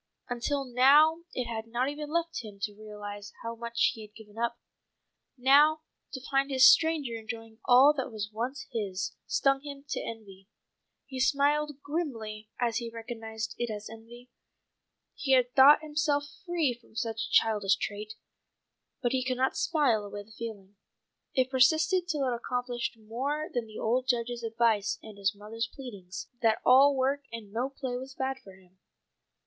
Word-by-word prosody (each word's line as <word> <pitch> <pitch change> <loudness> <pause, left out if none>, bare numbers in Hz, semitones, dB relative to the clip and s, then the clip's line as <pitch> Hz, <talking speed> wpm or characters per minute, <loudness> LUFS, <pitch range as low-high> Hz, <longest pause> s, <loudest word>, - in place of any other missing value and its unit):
Until 270 +3 -2
now 290 +7 +5
it 250 - -3
had 225 -1 -5
not 240 +3 0
even 295 +1 -5
left 330 -3 -1
him 210 -2 -9
time - - -22
to 205 -1 -2
realize 205 -1 -8
how 230 0 -4
much 235 0 0
he 225 - -10
had 215 0 -13
given 215 -1 -14
up. 235 +1 -1 0.8
Now 290 +5 +5 0.3
to 265 - -4
find 275 0 +2
this 260 -1 +6
stranger 315 -7 +4
enjoying 225 0 -8
all 265 +4 +7
that 265 -4 -4
was 210 -1 -5
once 245 +6 -4
his, 200 -5 -3
stung 275 0 +2
him 280 -1 -9
to - - -2
envy. 200 -4 -9 0.6
He 265 -1 -7
smiled 290 +1 +1
grimly 225 -9 -4
as 235 -2 +1
he 235 -1 -3
recognized 225 -1 -6
it 240 -1 -1
as 210 0 -6
envy. 240 +2 -13 0.8
He 275 -5 0
had 250 -1 +3
thought 285 +3 +7
himself 295 -1 0 0.2
free 330 -7 +1
from 235 -2 -21
such 225 -1 -2
a - - -15
childish 210 -3 +4
trait. 210 +1 -5 0.9
But 240 - +2
he 260 -1 +1
could 255 -1 -1
not 260 +1 +1
smile 280 -10 +2
away 205 0 -7
the 215 - -21
feeling. 205 -3 -8 0.6
It 260 -1 +2
persisted 315 +7 +3
till 295 -6 0
it 250 - 0
accomplished 245 0 -3
more 270 +9 -3
than 240 -3 -2
the 215 - -10
old 250 +3 0
Judge's 240 -1 0
advice 225 -2 +1
and 210 -2 -11
his 200 +2 +1
mother's 225 +3 -5
pleadings, 200 -9 -8
that 225 -2 +3
all 275 +3 +7
work 270 +2 +1
and 225 -3 -8
no 245 +4 -1
play 265 -2 -5
was 265 +1 -8
bad 265 0 -2
for 195 -7 -15
him. 185 -1 -24
240 Hz, 170 wpm, -29 LUFS, 220-275 Hz, 0.9 s, all